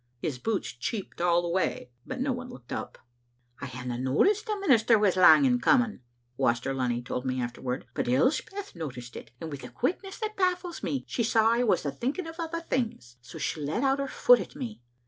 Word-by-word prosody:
His 130 0 -3
boots 215 - -1
cheeped 175 - -5
all 175 0 +3
the - - -2
way, 170 -8 -1 0.2
but - - -5
no 265 +1 0
one 250 0 -5
looked 125 - -9
up. - - -5 0.3
" 120 0 -30
I 140 - -4
hadna 125 -1 -5
noticed 385 - +2
the 425 -2 -1
minister 240 - +4
was 205 -3 +3
lang 185 +10 +7
in 245 -2 +3
coming," 245 -5 +3 0.4
Waster 130 0 +1
Lunny 125 -2 -1
told 125 0 -3
me 130 -1 -1
afterward, 125 +1 -3
"but - - -2
Elspeth 305 - 0
no 160 -3 -4
ticed 125 -1 -10
it, - - -9
and 160 - -6
with 140 -1 -7
a - - -7
quickness 375 +9 -2
that 430 -1 -4
baffles 360 -2 0
me 275 - -2
she - - -2
saw 225 0 +4
I 235 +1 +2
was 220 - +2
thinking 245 - -2
o' 325 - -6
other 335 0 -3
things. 220 - -3
So 125 - -11
she 155 - -2
let 150 - -1
out 270 0 +2
her 275 - -1
foot - - +5
at - - -7
me. 230 - -6
210 Hz, 215 wpm, -28 LUFS, -, 0.4 s, lang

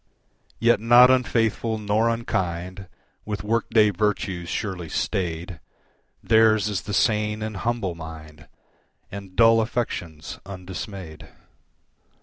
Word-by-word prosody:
Yet 120 -2 +3
not 120 +3 +7
unfaithful 115 -3 +1
nor 105 +2 +1
unkind, 95 -5 -3 0.4
with 105 -1 -5
work 115 +2 -1
day 105 -2 +4
virtues 95 -3 -2
surely 95 -6 -4
staid, 85 -2 -3 0.6
Theirs 110 -1 +4
is 100 -4 -2
the 105 - -6
sane 105 -1 +1
and 110 -1 -4
humble 115 -5 -2
mind, 80 -2 -11 0.6
And 100 -2 -9
dull 115 0 +6
affections 90 -9 -4
undismayed. 95 -3 -8
105 Hz, 110 wpm, -24 LUFS, 90-115 Hz, 0.6 s, not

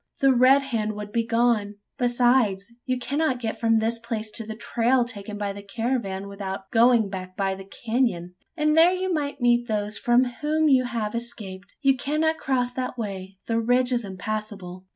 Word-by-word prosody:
The 270 -1 +5
Red 260 +3 +5
Hand 220 -5 -2
would 210 0 -7
be 230 +1 +1
gone. 230 -3 +1 0.2
Besides, 240 -4 +2
you 255 0 +1
cannot 280 +2 0
get 225 -2 -4
from 225 -1 +3
this 225 +1 +1
place 225 -2 -4
to 225 - -2
the 220 - -5
trail 235 +2 +1
taken 210 -3 -6
by 205 -1 -2
the 200 - -8
caravan, 200 -2 -3
without 195 -1 -6
going 230 -1 +5
back 185 -1 -7
by 195 -1 0
the 190 0 -9
canon; 220 -5 -1 0.2
and 305 0 +2
there 335 +3 +6
you 370 0 -1
might 285 -3 -2
meet 240 0 +3
those 210 -1 -1
from 240 +1 +4
whom 300 +5 0
you 260 -3 +4
have 230 -4 -3
escaped. 205 -5 -6
You 270 -1 +5
cannot 310 +4 0
cross 250 -2 0
that 255 0 -4
way: 195 -3 -5
the 230 0 0
ridge 245 +2 +2
is 240 -1 0
impassable." 195 -2 -6
230 Hz, 185 wpm, -25 LUFS, 205-255 Hz, 0.2 s, there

